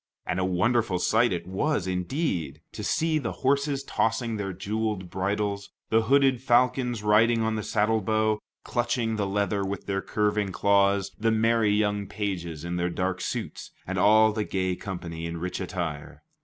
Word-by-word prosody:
And 95 - -1
a - - +1
wonderful 105 +2 +1
sight 110 +5 +2
it 85 -2 -3
was, 95 - -1
indeed, 90 - -2
to 105 - -7
see 155 +8 +1
the - - -3
horses 140 0 +1
tossing 115 -2 0
their 100 -2 -3
jeweled 100 0 -3
bridles, 100 +1 -2 0.2
the 115 0 +5
hooded 135 +1 +3
falcons 125 -2 +2
riding 115 +2 +4
on 110 0 0
the 110 - -2
saddlebow, 110 0 +1 0.2
clutching 120 -2 -1
the 100 -2 0
leather 100 0 0
with 95 0 -4
their 95 -1 -1
curving 105 -1 0
claws, 100 0 +2
the 115 +1 +2
merry 115 0 +3
young 105 -1 +1
pages 85 -7 -4
in 85 0 -3
their 90 0 0
dark 90 +1 -2
suits, - - -4 0.2
and 95 0 -2
all 110 +2 +5
the 110 -1 -1
gay 95 -2 -1
company 85 -4 -6
in 85 0 -5
rich 90 +3 -4
attire. 85 -5 -5
105 Hz, 165 wpm, -26 LUFS, 95-115 Hz, 0.2 s, the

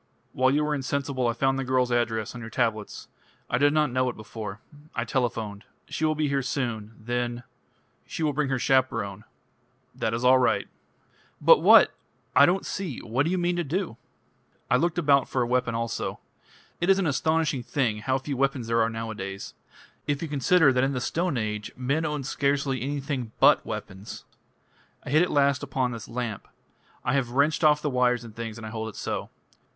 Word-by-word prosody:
"While 130 0 +3
you 145 +3 +2
were 150 0 0
insensible 140 -2 -1
I 115 - +1
found 135 +2 +1
the - - -1
girl's 130 -1 +1
address 115 -2 0
on 125 - -8
your 115 - -7
tablets. 110 -3 -2 0.4
I 120 - +2
did 145 +1 +4
not 150 -3 +2
know 130 0 +1
it 120 - -6
before. 105 -1 -7 0.4
I 115 - -1
telephoned. 115 -5 -2 0.3
She 155 - -1
will 155 0 +2
be 155 0 0
here 140 -1 0
soon. 120 -5 -3
Then 120 +1 -3 0.3
" - - -40
"She 165 - -4
will 150 -2 +1
bring 145 -1 0
her 135 - +1
chaperone." 115 -6 0 0.7
"That 110 0 -1
is 120 - -3
all 130 +1 +6
right." 125 - +1 0.7
"But - - +7
what? - - +7 0.4
I - - +8
don't 185 +2 +1
see. 180 -10 -4
What 125 +5 0
do - - +1
you 185 - 0
mean 175 0 +1
to 175 - 0
do?" 170 - -2 0.8
"I - - +6
looked 165 +6 +1
about 140 -5 +3
for 125 - +1
a - - -2
weapon 125 -1 0
also. 115 -1 -3 0.6
It 175 - 0
is 195 - +6
an 195 - 0
astonishing 155 -1 +1
thing 120 -4 -1
how 130 +4 0
few 135 +1 -4
weapons 135 -2 0
there 115 0 +2
are 110 - +2
nowadays. 110 -4 -6 0.5
If 145 +1 -1
you - - -2
consider 145 +1 +4
that 125 0 +2
in 135 +1 +1
the 125 - -1
Stone 165 +3 -1
Age 105 -2 -3
men 140 +6 0
owned 150 -3 -2
scarcely 140 -1 0
anything 135 -4 -3
but - - +6
weapons. 95 +3 -7 0.8
I - - -6
hit 155 +3 +5
at 180 - +2
last 140 -1 +2
upon 130 -3 -1
this 115 -3 -7
lamp. 115 -4 -4 0.6
I 125 - +1
have 135 -3 +1
wrenched 145 +5 +2
off 150 -1 +4
the 150 - 0
wires 125 -1 +2
and 110 -2 -11
things, 115 -1 -5
and 115 - -8
I 110 - -6
hold 110 0 -4
it 105 - -12
so." - - -4
130 Hz, 200 wpm, -26 LUFS, 115-145 Hz, 0.8 s, I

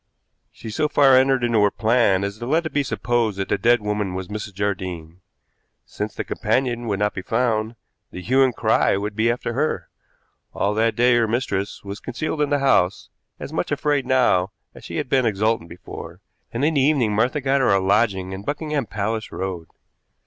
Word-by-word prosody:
She 110 - -9
so 150 +7 0
far 140 -2 +5
entered 130 -1 +3
into 115 -3 +2
her 105 - +5
plan 110 -4 +2
as 100 +2 -4
to 120 - -5
let 160 +4 +1
it 155 - -4
be 145 - +2
supposed 120 -6 -1
that 95 - -3
the - - +1
dead 120 0 +3
woman 105 -3 -2
was 95 0 -5
Mrs. 105 -2 -6
Jardine. 90 -4 -4 0.6
Since - - -5
the - - -3
companion 120 -2 -1
would 100 -2 0
not 105 +1 0
be 90 - -5
found, 110 +1 0 0.3
the - - -8
hue 130 +6 +3
and 130 -3 +3
cry 110 -3 +2
would 105 +1 -4
be 110 +2 +2
after 120 0 -2
her. 120 - -1 0.7
All 100 - 0
that 110 +1 +1
day 120 +1 +4
her 115 -1 +2
mistress 105 -4 -2
was 100 +2 -7
concealed 155 -1 -3
in 145 - +1
the 145 - +2
house, 100 -10 +2 0.3
as - - -7
much - - -2
afraid 145 -3 0
now 125 -8 +3 0.2
as - - -14
she - - -7
had - - -2
been 130 -2 +2
exultant 110 -3 0
before, 85 0 -10 0.3
and 120 +5 -1
in 160 - +2
the 140 - +2
evening 130 -6 +2
Martha 120 +8 +1
got 135 0 +1
her 130 - +3
a 100 - +4
lodging 95 -1 +1
in 95 - -6
Buckingham 145 +1 -3
Palace 110 +3 -3
Road. 90 -3 -5
115 Hz, 200 wpm, -22 LUFS, 100-130 Hz, 0.7 s, far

